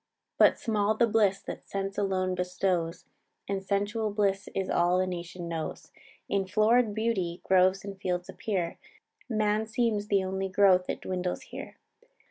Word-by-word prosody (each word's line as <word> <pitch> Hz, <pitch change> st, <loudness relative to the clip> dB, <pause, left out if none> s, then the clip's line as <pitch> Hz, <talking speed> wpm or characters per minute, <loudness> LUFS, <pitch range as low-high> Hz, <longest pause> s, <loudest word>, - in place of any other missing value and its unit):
"But -, -, +6 dB
small 215 Hz, -2 st, +1 dB
the 235 Hz, -, +4 dB
bliss 210 Hz, -3 st, +2 dB
that -, -, -8 dB
sense 195 Hz, 0 st, -3 dB
alone 185 Hz, -2 st, 0 dB
bestows, 180 Hz, -2 st, -1 dB, 0.4 s
And 195 Hz, -1 st, -2 dB
sensual 205 Hz, +2 st, -1 dB
bliss 200 Hz, -1 st, 0 dB
is 195 Hz, -, -1 dB
all 175 Hz, +1 st, +2 dB
the 185 Hz, -, +2 dB
nation 175 Hz, -1 st, -5 dB
knows. 165 Hz, -2 st, -5 dB, 0.4 s
In 195 Hz, -1 st, 0 dB
florid 215 Hz, +2 st, +3 dB
beauty 195 Hz, -6 st, -1 dB
groves 190 Hz, +1 st, +3 dB
and 195 Hz, -1 st, -8 dB
fields 180 Hz, -1 st, -2 dB
appear, 185 Hz, -6 st, -3 dB, 0.5 s
Man 215 Hz, -1 st, +1 dB
seems 220 Hz, -2 st, 0 dB
the 200 Hz, -2 st, +2 dB
only 190 Hz, +1 st, -2 dB
growth 185 Hz, -1 st, +4 dB
that -, -, -3 dB
dwindles 180 Hz, -1 st, -3 dB
here. -, -, -9 dB
195 Hz, 150 wpm, -29 LUFS, 185-210 Hz, 0.5 s, But